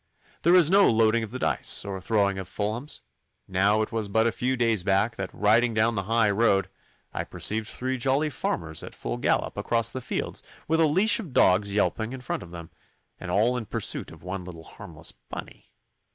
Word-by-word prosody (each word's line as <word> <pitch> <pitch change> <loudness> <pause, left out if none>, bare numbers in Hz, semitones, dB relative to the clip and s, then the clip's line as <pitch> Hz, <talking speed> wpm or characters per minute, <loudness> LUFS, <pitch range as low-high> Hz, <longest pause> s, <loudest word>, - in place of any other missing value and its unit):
There 175 +2 +5
is 170 -3 +5
no 200 +1 +6
loading 115 0 +3
of 110 - -5
the 125 - -5
dice, 130 - 0
or 95 -1 -5
throwing 100 0 +1
of 95 - -6
fulhams. 110 +8 -3 0.5
Now 100 +3 +2
it 110 - -6
was 110 -2 -2
but 110 +3 +2
a 115 - +2
few 130 +3 -1
days 115 -4 +2
back 100 +5 +1
that, 95 -3 -5
riding 115 +3 +2
down 110 +2 +3
the 95 -4 -3
high 115 -2 +3
road, 100 -3 +2 0.4
I - - -2
perceived 110 0 -3
three 130 +2 -3
jolly 140 +4 +1
farmers 80 - -3
at - - -9
full - - -4
gallop - - 0
across 115 -1 +1
the 130 - -5
fields - - -3 0.3
with 160 +1 +2
a 160 - +5
leash 190 +11 +4
of 175 - -8
dogs 100 0 +4
yelping 110 +3 0
in 130 - -7
front 125 - -3
of 85 - -10
them, 85 -1 -10 0.5
and - - -7
all 110 +7 +2
in 120 -3 -3
pursuit - - -2
of - - -14
one 90 +1 -5
little 85 -2 -10
harmless - - -6
bunny. - - -11
110 Hz, 205 wpm, -26 LUFS, 95-125 Hz, 0.5 s, no